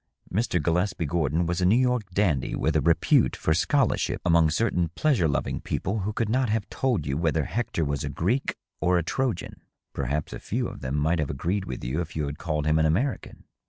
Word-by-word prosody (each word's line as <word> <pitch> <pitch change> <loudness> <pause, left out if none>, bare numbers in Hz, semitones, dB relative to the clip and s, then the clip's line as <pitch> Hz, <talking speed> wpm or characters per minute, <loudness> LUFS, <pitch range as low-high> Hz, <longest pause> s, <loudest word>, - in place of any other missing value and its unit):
Mr. 105 -3 +1
Gillespie 85 +3 0
Gordon 80 +1 0
was 85 +2 -1
a - - +3
New 105 +5 +5
York 125 -5 +1
dandy 90 -8 +1
with 80 - 0
a 75 - +3
repute 80 +2 +3
for 80 - +1
scholarship 130 - +1
among 85 -2 +4
certain 90 -1 +1
pleasure 130 - +2
loving 70 - -1
people 100 +4 -2
who 100 +2 -2
could 110 +1 -1
not 125 +2 +1
have 110 -1 0
told 125 - 0
you 70 - -1
whether 80 -2 +1
Hector 105 -3 -2
was 70 -1 -2
a - - -3
Greek 115 +11 -1 0.2
or 90 0 +2
a 85 - +1
Trojan: 120 +1 -2 0.3
perhaps 75 -1 -2
a - - -6
few - - -2
of - - -9
them 65 +2 -3
might 80 +3 +1
have 75 - -1
agreed 90 +8 -2
with 65 - -6
you 65 +8 -1
if 80 - -7
you 75 -2 -1
had 70 +1 -6
called 75 -3 -2
him 75 +1 +3
an 80 - +3
American. 120 - -1
85 Hz, 215 wpm, -26 LUFS, 75-105 Hz, 0.3 s, New